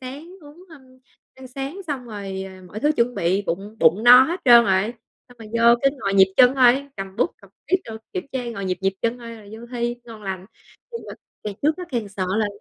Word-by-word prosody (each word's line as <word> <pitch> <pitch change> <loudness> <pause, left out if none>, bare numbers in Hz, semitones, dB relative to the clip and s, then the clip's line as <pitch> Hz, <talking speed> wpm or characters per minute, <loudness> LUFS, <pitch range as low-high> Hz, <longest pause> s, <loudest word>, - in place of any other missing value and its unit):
sáng, 275 +6 -9
uống, 305 +5 -15
ơm, 315 -5 -15 0.5
ăn 265 0 -12
sáng 275 +8 -6
xong 275 -5 -4
rồi, 195 -3 -6 0.2
mọi 210 +4 -8
thứ 300 +1 +2
chuẩn 240 +1 +1
bị, 185 +4 0
bụng 200 +6 -4
bụng 165 +6 +4
no 250 +1 +10
hết 340 +7 -2
trơn 235 -2 +8
rồi, 195 +4 +1 0.3
xong 245 -1 -19
rồi 220 - -11
vô 235 +1 +6
cứ 275 - +5
ngồi 195 -3 -1
nhịp 190 -1 +5
chân 255 +1 +6
thôi, 265 +2 +4
cầm 195 0 -7
bút - - +1
cầm - - -17 0.2
viết 370 - +4
đồ, 225 -1 -8 0.2
kiểm 365 -6 -4
tra, 255 -2 -3
ngồi 200 -4 -6
nhịp 185 -1 -2
nhịp 195 0 0
chân 235 +2 -1
thôi 230 -1 -9
rồi 210 -2 -15
vô 225 +2 -10
thi 240 0 -2
ngon 225 -3 -12
lành. 190 -1 -5 0.5
Nhưng 465 - -5
mà - - -7 0.3
ngày 205 -2 -4
trước 305 +3 +2
á 360 - -6
càng 230 -5 -3
sợ 195 -1 -4
là 215 - +1
235 Hz, 240 wpm, -22 LUFS, 200-265 Hz, 0.5 s, no